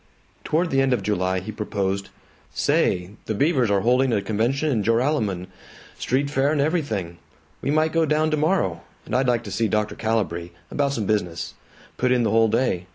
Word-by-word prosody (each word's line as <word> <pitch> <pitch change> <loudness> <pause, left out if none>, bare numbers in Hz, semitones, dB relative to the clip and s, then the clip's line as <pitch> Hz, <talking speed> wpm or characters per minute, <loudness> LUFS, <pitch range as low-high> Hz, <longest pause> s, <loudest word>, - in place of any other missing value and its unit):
Toward 165 +2 0
the 135 - +3
end 135 -1 +2
of 110 -5 -1
July 95 -2 0
he 110 - -6
proposed, 100 -2 -2 0.5
"Say, 90 +1 +1 0.2
the 110 - -1
Beavers 135 -2 +2
are 100 -1 +2
holding 125 +3 +3
a 110 - +2
convention 120 +9 0
in 115 -5 +1
Joralemon, 115 - +1 0.5
street 140 +3 0
fair 140 0 +2
and 155 - 0
everything. 125 - -1 0.4
We - - -2
might 155 +2 +2
go 165 -1 +2
down 155 +1 +2
tomorrow. 155 - +1 0.2
And 110 - -3
I'd 130 0 +2
like 120 -1 +1
to 100 - -8
see 110 +4 +1
Dr. 105 +1 0
Calibree 105 -7 -1 0.2
about 140 -1 0
some 110 -6 -2
business. 90 -5 -1 0.4
Put 125 0 +1
in 125 -1 +3
the 110 - +1
whole 115 +1 +4
day. 110 -6 0
115 Hz, 185 wpm, -23 LUFS, 100-140 Hz, 0.5 s, whole